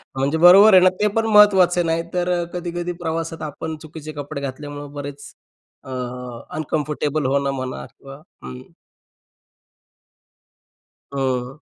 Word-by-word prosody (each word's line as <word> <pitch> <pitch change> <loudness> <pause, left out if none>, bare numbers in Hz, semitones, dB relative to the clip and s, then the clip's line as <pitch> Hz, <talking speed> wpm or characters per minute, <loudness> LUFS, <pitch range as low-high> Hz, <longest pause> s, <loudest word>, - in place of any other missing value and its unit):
म्हणजे 140 +4 0
बरोबर 190 +5 +8
आहे 185 - +8
ना, 185 - +7
ते 210 - +3
पण 225 - +1
महत्त्वाचं 200 -5 +5
आहे. 175 - +1
नाही 165 +1 0
तर 180 0 -1
अ, - - -2
कधी-कधी 175 0 -4
प्रवासात 165 0 -3
आपण 160 +1 -5
चुकीचे 155 -1 -9
कपडे 145 0 -6
घातल्यामुळं 145 +1 -7
बरेच, 145 0 -8 0.5
अ, - - -12 0.7
अनकम्फर्टेबल 150 -1 -2
होणं 140 +1 +1
म्हणा 130 -1 -5
किंवा 135 0 -13 0.3
हं. 65 0 -8 2.5
हं. 130 0 -2
155 Hz, 130 wpm, -21 LUFS, 140-175 Hz, 2.5 s, बरोबर